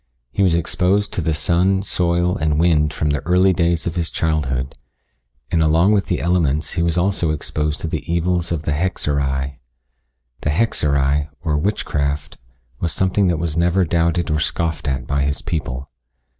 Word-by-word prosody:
He 100 - -1
was 90 -4 +4
exposed 95 +4 +1
to - - -1
the 80 -1 0
sun, 90 +6 +2
soil, 90 -1 +1
and 75 -1 0
wind 75 -3 +3
from 75 -1 -1
the 75 - 0
early 90 +5 +3
days 85 -1 +1
of 85 - -2
his 85 -3 -1
childhood, 70 -5 -1 0.8
and 80 - +2
along 80 +5 +4
with 100 -2 +2
the 90 - 0
elements 80 -4 +1
he 85 - -1
also 85 +2 +1
was 75 - +1
exposed 75 0 -2
to - - -3
the 80 +1 -4
evils 85 0 0
of 80 -3 -2
the 75 - -1
hexerei. 70 -4 -1 0.8
The - - -2
hexerei, 75 -6 +1 0.2
or 75 -2 0
witchcraft, 75 -4 -2 0.4
was 85 - -1
something 95 +2 +1
that 85 -2 +1
was 80 -1 -2
never 90 +2 +2
doubted 85 0 +1
or 75 - +1
scoffed 80 0 -2
at 65 -2 -1
by 70 +2 0
his 70 +1 -1
people. 70 -5 -4
80 Hz, 170 wpm, -20 LUFS, 75-90 Hz, 0.8 s, was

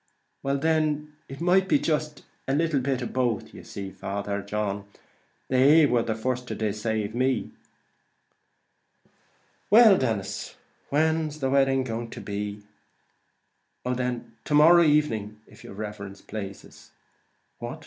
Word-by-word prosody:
"Well 140 +1 0
then, 150 0 0 0.2
it 135 - -8
might 185 +2 +3
be 295 - +4
jist 150 - -2 0.2
a 135 - +1
little 160 -2 +1
of 130 -2 -2
both; 120 -5 0
but - - -18
you - - -11
see, 100 -1 -7
Father 100 +1 -4
John, 100 0 -3 0.6
they 140 +5 +6
war 125 -4 +2
the 110 -1 -2
first 125 +2 -2
to - - -4
decave 110 0 -2
me." 130 +2 0 2.2
"Well, 215 -2 +7
Denis, 110 -6 -3
and - - -31 0.3
when's 155 0 +1
the 135 -2 -1
wedding 135 -1 +3 0.3
to - - -8
be?" 105 0 -5 1.2
"Oh 125 - 0
then, 125 -2 -3
to 150 - 0
morrow 165 +4 +7
evening, 115 -10 +1
if - - -17
yer - - -10
riverence 100 -1 -7
plazes." 100 -2 -8 0.7
"What! - - -6
130 Hz, 135 wpm, -26 LUFS, 105-150 Hz, 2.2 s, Well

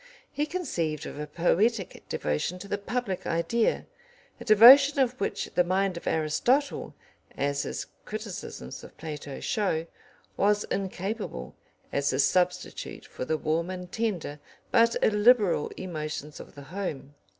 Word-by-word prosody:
He 295 +1 -1
conceived 170 - -2
of - - -7
a 150 - -4
poetic 190 +6 +1
devotion 75 - -1
to 180 - -9
the 200 0 -2
public 205 -3 -3
idea, 220 +8 +1 0.5
a - - -7
devotion 260 +7 +8
of 255 -4 +1
which - - -2
the 180 - +4
mind 185 +1 +1
of 170 - -8
Aristotle, 160 - +1 0.4
as 140 0 0
his - - -4 0.2
criticisms 65 +1 -7
of - - -13
Plato 150 -3 -6
show, 175 -7 0 0.5
was 205 +1 +3
incapable, 195 - -3 0.4
as 140 0 +1
a - - 0
substitute 180 +5 0
for - - -6
the 155 - 0
warm 160 +3 -1
and 180 -1 -6
tender 185 -10 -2 0.3
but 230 -1 +4
illiberal 210 -6 +4
emotions 155 -4 -5
of - - -12
the 140 - -10
home. 150 -8 -4
180 Hz, 140 wpm, -28 LUFS, 155-220 Hz, 0.5 s, devotion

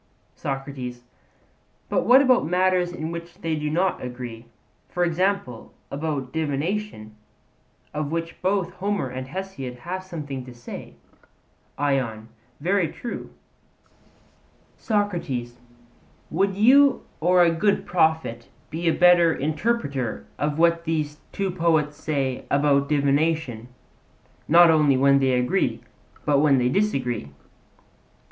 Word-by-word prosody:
SOCRATES: 135 -3 -5 0.8
But - - 0
what 260 +3 +7
about 255 -2 +4
matters 180 0 +2
in 160 -2 -5
which 170 0 -7
they 165 -1 -1
do 150 0 -2
not 180 +5 0
agree? 125 -2 -7 0.4
for 175 - -1
example, 175 - -1 0.2
about 140 -3 -3
divination, 155 - -3 0.8
of 150 -1 -3
which 165 0 -4
both 185 -1 0
Homer 200 -7 -2
and 130 +1 -6
Hesiod 145 -7 -6
have 185 +2 -5
something 145 -8 -6
to 125 -1 -11
say, 120 +1 -9 0.8
ION: 130 -6 -1 0.3
Very 180 +3 +1
true: 235 +9 -7 1.5
SOCRATES: 170 - -2 0.7
Would 195 +4 +1
you 270 +7 +5 0.2
or 180 +2 +4
a 170 - +4
good 185 +5 +1
prophet 160 -9 0 0.2
be 170 +2 -3
a 165 - +4
better 175 -2 +5
interpreter 140 - -2
of 145 0 -1
what 170 0 +3
these 155 -2 -2
two 195 -1 -2
poets 160 -4 +1
say 135 -5 -2
about 140 0 +2
divination, 145 -4 +1 0.8
not 170 +1 +7
only 150 -4 +4
when 140 +1 +5
they 135 -1 +2
agree, 125 0 +1 0.5
but 145 -2 +3
when 145 -2 +4
they 125 -1 +2
disagree? 125 - -1
155 Hz, 120 wpm, -24 LUFS, 135-180 Hz, 1.5 s, what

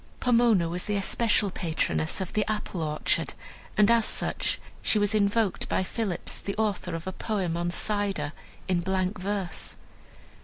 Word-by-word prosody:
Pomona 230 -8 +4
was 175 +2 -2
the 210 0 0
especial 205 0 +2
patroness 85 - -1
of 190 -2 -4
the 210 - +2
Apple 205 -4 -3
orchard, 150 -1 0 0.4
and 210 +1 +6
as 230 -1 +5
such - - 0 0.2
she - - +3
was 205 0 +2
invoked 210 -1 +1
by - - +1
Phillips, 195 -2 -2
the 200 - -3
author 200 -5 -1
of 165 - -6
a 190 - -2
poem 190 -7 -1
on 175 0 -1
Cider, 195 -5 0 0.3
in 185 -2 +2
blank 185 +2 -1
verse. 195 -3 -2
195 Hz, 155 wpm, -27 LUFS, 175-210 Hz, 0.4 s, and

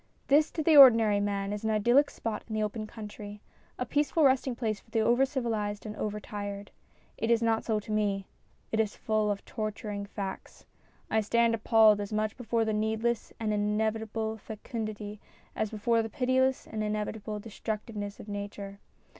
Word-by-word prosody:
This 300 +3 +5
to 315 - -2
the 315 0 +5
ordinary 225 -7 +8
man 200 0 -1
is 210 - -5
an 220 - 0
idyllic 240 +7 +4
spot 220 -2 -4
in 220 - -4
the 215 - +1
open 215 +1 -3
country 210 -1 -9 0.4
a 250 - -2
peaceful 295 +4 +1
resting 260 -2 +3
place 220 -3 -2
for - - -26
the 225 0 +1
over 240 +4 +3
civilised 225 -6 -2
and 215 0 -5
over 210 0 -3
tired. 205 -1 -6 0.5
It 225 - -1
is 235 0 +3
not 225 -1 +2
so 220 -2 0
to 210 - -8
me. 205 -2 0 0.5
It 220 - 0
is 215 -2 +1
full 215 -1 0
of 200 -1 -3
torturing 210 -2 -4
facts. 195 -1 -7 0.5
I 220 - +3
stand 235 +2 +2
appalled 220 -2 +5
as 205 - -5
much 215 0 -1
before 230 -2 0
the 220 - 0
needless 220 +2 -1
and 215 -2 0
inevitable 220 +1 -1
fecundity 215 -1 -6 0.4
as 215 - -1
before 230 +2 +1
the 225 - -4
pitiless 260 +1 +1
and 215 -1 -4
inevitable 210 0 -3
destructiveness 210 -1 -5
of - - -10
nature. 200 -1 -6
215 Hz, 175 wpm, -29 LUFS, 210-230 Hz, 0.5 s, ordinary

